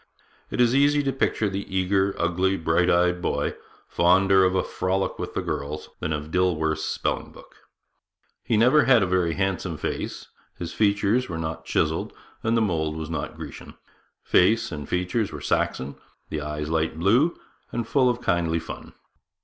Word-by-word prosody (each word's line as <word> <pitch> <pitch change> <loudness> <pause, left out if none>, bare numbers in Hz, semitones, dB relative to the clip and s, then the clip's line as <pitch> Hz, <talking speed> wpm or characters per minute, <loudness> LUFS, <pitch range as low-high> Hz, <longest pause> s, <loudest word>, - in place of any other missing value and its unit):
It - - -4
is 120 -1 +4
easy 145 +2 +4
to 135 -1 0
picture 110 -4 0
the 100 0 -5
eager, 95 +1 +1
ugly, 90 +3 +1
bright 85 +2 +2
eyed 90 0 +2
boy, - - -1 0.3
fonder 95 +2 +4
of 95 0 +2
a 95 - +2
frolic 95 +1 -2
with - - -5
the - - -1
girls 75 +1 -4
than 80 - -3
of 75 0 -4
Dilworth's 80 -4 +1
spelling - - -2
book. - - -16 0.9
He 115 - +1
never 125 +7 +5
had 125 -6 +5
a - - +2
very 90 -2 +1
handsome 95 -4 -1
face; - - -4 0.3
his 85 - -5
features 105 +3 +2
were 85 - -4
not 80 0 -4
chiselled, - - 0 0.3
and 115 +1 +1
the - - +3
mould 80 -7 0
was 80 0 -5
not 75 -1 -4
Grecian. 75 -3 -9 0.5
Face 110 +4 +3
and 75 -3 -6
features 90 +4 -1
were - - -6
Saxon; 70 +2 -1 0.3
the 75 - -3
eyes 75 +1 -4
light 80 -1 0
blue, 115 - +3 0.3
and 120 -2 -3
full 130 -1 +3
of 125 0 -1
kindly 85 -6 +1
fun. 80 - -8
90 Hz, 170 wpm, -25 LUFS, 80-105 Hz, 0.9 s, never